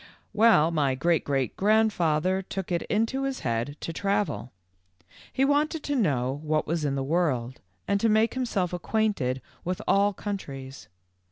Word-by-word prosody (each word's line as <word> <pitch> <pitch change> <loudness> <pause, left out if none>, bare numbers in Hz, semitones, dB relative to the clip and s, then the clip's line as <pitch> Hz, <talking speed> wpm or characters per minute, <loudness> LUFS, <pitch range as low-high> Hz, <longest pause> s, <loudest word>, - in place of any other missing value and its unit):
"Well, 210 -8 +5
my 145 -5 +1
great 165 +5 +1
great 135 -4 -1
grandfather 190 -4 +2
took 190 -1 -6
it 170 -1 +1
into 225 +5 0
his 270 -1 -3
head 120 +5 -2
to 165 - -4
travel. 200 - -1 0.8
He 270 - +2
wanted 295 +2 +1
to 290 - -1
know 140 - 0
what 155 0 0
was 165 0 -2
in 140 -2 0
the 135 - -1
world 135 -6 -1 0.3
and 200 - +2
to 225 - +2
make 220 +1 +3
himself 215 -9 -1
acquainted 180 - -1 0.2
with 180 +1 -2
all 200 +1 +4
countries. 140 -11 -6
180 Hz, 155 wpm, -27 LUFS, 140-215 Hz, 0.8 s, Well